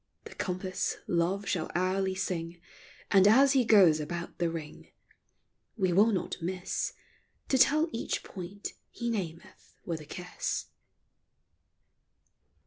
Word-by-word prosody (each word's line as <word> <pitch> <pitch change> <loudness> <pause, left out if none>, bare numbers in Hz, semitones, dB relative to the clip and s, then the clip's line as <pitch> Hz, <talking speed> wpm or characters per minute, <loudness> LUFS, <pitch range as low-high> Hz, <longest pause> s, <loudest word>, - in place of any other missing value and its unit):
The - - -10
compass, 185 0 -2
love 180 +4 0
shall 170 -4 -1
hourly 190 +1 +1
sing; 175 -2 -3 0.5
And, 195 -1 +6
as 270 +6 +6
he 265 -2 +4
goes 190 -9 +6
about 170 +3 -5
the 170 -1 +1
ring, 160 -2 -7 0.9
We 185 -4 +2
will 210 +5 +5
not 190 -4 -2
miss 180 +2 -2 0.6
To 265 - +3
tell 305 +5 +5
each 230 - -3
point 190 +2 -7 0.2
he 235 -1 -3
nameth 170 -6 -6
with 165 -3 -3
a - - -11
kiss. 180 +4 -4
185 Hz, 125 wpm, -30 LUFS, 170-205 Hz, 0.9 s, And